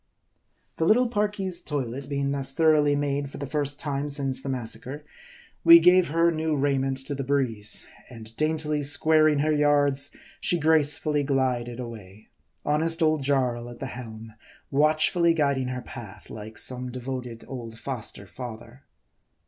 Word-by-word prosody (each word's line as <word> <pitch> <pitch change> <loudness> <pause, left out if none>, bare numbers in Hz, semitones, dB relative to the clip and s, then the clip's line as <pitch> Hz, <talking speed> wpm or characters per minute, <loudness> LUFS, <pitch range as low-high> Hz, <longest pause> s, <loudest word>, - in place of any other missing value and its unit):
The 160 - +1
little 245 +7 +4
Parki's 205 -5 -2
toilet 135 -3 -4
being 140 -1 -1
thus 135 -1 -2
thoroughly 155 -2 +3
made 145 -1 -1
for - - -10
the 140 - -5
first 145 0 -2
time 145 -1 -2
since 135 -2 -1
the 140 - -5
massacre, 125 +3 -5 0.6
we 335 0 +10
gave 180 - +5
her 165 +3 +2
new 160 -1 -1
raiment 135 -1 0
to 145 - -3
the 140 0 -3
breeze, 125 -6 0 0.2
and 115 -2 -10
daintily 155 0 0
squaring 155 +1 +4
her 155 +1 +1
yards, 145 -2 +3 0.3
she 175 - 0
gracefully 150 -1 +2
glided 130 -3 -1
away; 110 -4 -9 0.4
honest 165 +3 +2
old 155 -2 +2
Jarl 125 -4 0
at 120 - -10
the 135 - -6
helm, 115 -2 -9 0.4
watchfully 155 +4 +3
guiding 140 -4 +1
her 125 0 -4
path, 110 -3 -11
like 110 +1 -9
some 125 0 0
devoted 125 -2 -6
old 115 -4 -8
foster 120 -6 -6
father. 120 +3 -9
140 Hz, 150 wpm, -26 LUFS, 125-155 Hz, 0.6 s, we